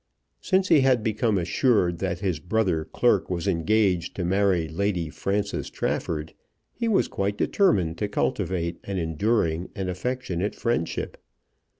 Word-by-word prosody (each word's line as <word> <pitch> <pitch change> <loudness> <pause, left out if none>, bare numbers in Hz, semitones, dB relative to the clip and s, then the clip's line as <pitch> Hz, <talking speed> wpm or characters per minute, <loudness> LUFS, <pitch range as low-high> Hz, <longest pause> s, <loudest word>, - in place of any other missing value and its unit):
Since 190 0 +1
he 160 -4 +6
had 130 -4 +3
become 110 -1 +1
assured 90 0 +2
that 95 -2 -2
his 90 -7 -1
brother 90 -2 0
clerk - - +1
was 90 +1 -2
engaged 95 0 +1
to 90 - -2
marry 95 -2 +2
Lady 85 0 -1
Frances 100 +3 -2
Trafford, 80 -1 -3 0.4
he 235 - -2
was 215 -4 +3
quite 100 +1 -2
determined 95 - +2
to 105 - 0
cultivate 85 -4 -1
an 100 -1 -4
enduring 85 0 0
and 95 -1 -3
affectionate 105 -2 -3
friendship. 115 -9 -2
95 Hz, 135 wpm, -25 LUFS, 85-110 Hz, 0.4 s, he